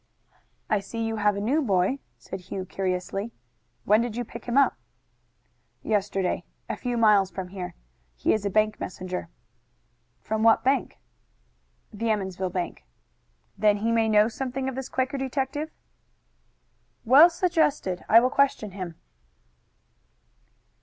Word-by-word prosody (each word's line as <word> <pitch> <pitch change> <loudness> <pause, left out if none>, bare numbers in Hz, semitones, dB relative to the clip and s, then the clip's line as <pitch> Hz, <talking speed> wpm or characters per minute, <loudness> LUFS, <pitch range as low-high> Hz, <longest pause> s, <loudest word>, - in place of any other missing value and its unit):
"I 215 - +2
see 230 +4 -5
you 225 0 -2
have 210 -1 +2
a - - -3
new 260 +10 +1
boy," 200 +2 +1 0.2
said 190 - -8
Hugh 185 +1 -6
curiously. 190 +3 -3 0.5
"When 215 +2 +5
did 235 -2 -3
you 245 - -2
pick 235 +2 -10
him 240 +2 -1
up?" 280 - +5 1.1
"Yesterday, 195 -3 0 0.2
a - - -2
few 245 -2 -3
miles 210 -4 +5
from 185 0 -6
here. 180 -1 -6 0.4
He - - +1
is 215 - -1
a 200 - 0
bank 215 +1 +1
messenger." 180 -2 -5 0.9
"From 220 +1 -2
what 225 0 +5
bank?" 270 +2 +1 1.0
"The 225 +2 -2
Emmonsville 190 -3 -1
bank." 180 -1 -4 0.7
"Then 210 -1 +3
he 225 +3 0
may 225 -1 +2
know 210 0 +5
something 260 +2 -3
of 265 - -2
this 265 +1 -5
Quaker 265 +2 -1
detective?" 270 +3 -2 1.4
"Well 280 +9 +8
suggested. 320 - 0
I 230 +2 +8
will 255 +1 +1
question 265 -7 +1
him." 185 -3 -6
215 Hz, 140 wpm, -26 LUFS, 195-255 Hz, 1.4 s, Well